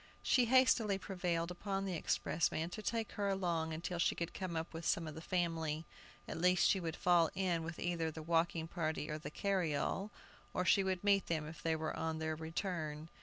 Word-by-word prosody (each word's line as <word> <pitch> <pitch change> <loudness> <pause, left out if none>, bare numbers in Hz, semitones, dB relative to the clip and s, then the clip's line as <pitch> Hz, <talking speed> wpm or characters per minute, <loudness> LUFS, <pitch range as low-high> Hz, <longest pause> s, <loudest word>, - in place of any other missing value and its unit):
She 250 - +4
hastily 230 -5 +4
prevailed 180 -3 -2
upon 195 +2 -2
the 190 - -2
expressman 165 0 0
to 215 - -5
take 225 +1 -1
her 200 -1 -1
along 170 -4 0
until 170 +2 -3
she - - +2
should 170 0 -3
come 185 -3 -4
up 160 +1 -3
with 165 +1 -6
some 165 -1 +1
of 155 - -5
the 160 - -8
family. 165 -3 -1 0.4
At - - -4
least 180 0 +5
she 195 - +3
would 165 -3 -3
fall 175 -2 +4
in 180 -3 +1
with 160 0 -5
either 170 -2 -1
the 160 0 -7
walking 165 0 +1
party 155 -3 -2
or 155 - -3
the 145 - -6
carryall, 185 +1 0 0.5
or 180 - +1
she 195 +3 +5
would 190 -1 -1
meet 200 -2 +3
them 160 -2 -1
if 155 -1 -9
they 165 0 +1
were 160 0 -2
on 160 0 -2
their 160 0 -1
return. 160 -1 -3
170 Hz, 205 wpm, -36 LUFS, 160-190 Hz, 0.5 s, least